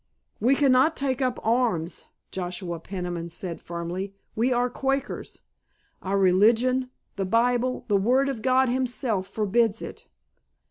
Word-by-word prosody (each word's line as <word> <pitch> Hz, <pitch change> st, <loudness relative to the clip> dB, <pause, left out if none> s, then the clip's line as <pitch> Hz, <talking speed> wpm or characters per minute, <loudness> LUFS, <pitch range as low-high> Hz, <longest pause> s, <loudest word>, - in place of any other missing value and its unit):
"We 250 Hz, +6 st, +4 dB
cannot 275 Hz, +2 st, +4 dB
take 270 Hz, -1 st, -1 dB
up 255 Hz, -2 st, 0 dB
arms," 225 Hz, -8 st, 0 dB, 0.3 s
Joshua 180 Hz, -2 st, -4 dB
Peniman 175 Hz, -1 st, -5 dB
said 175 Hz, 0 st, -6 dB
firmly. 175 Hz, +3 st, -5 dB, 0.2 s
"We 235 Hz, +4 st, +1 dB
are 245 Hz, 0 st, +2 dB
Quakers. 270 Hz, +2 st, -3 dB, 0.6 s
Our 195 Hz, +1 st, -1 dB
religion, 225 Hz, +7 st, +3 dB, 0.3 s
the 195 Hz, -, -1 dB
Bible, 245 Hz, +4 st, +1 dB
the 205 Hz, -3 st, +3 dB
Word 250 Hz, +7 st, +3 dB
of 265 Hz, -5 st, -3 dB
God 260 Hz, +1 st, +3 dB
Himself 245 Hz, -5 st, -1 dB
forbids 220 Hz, +2 st, +1 dB
it." -, -, -9 dB
230 Hz, 130 wpm, -26 LUFS, 185-255 Hz, 0.6 s, We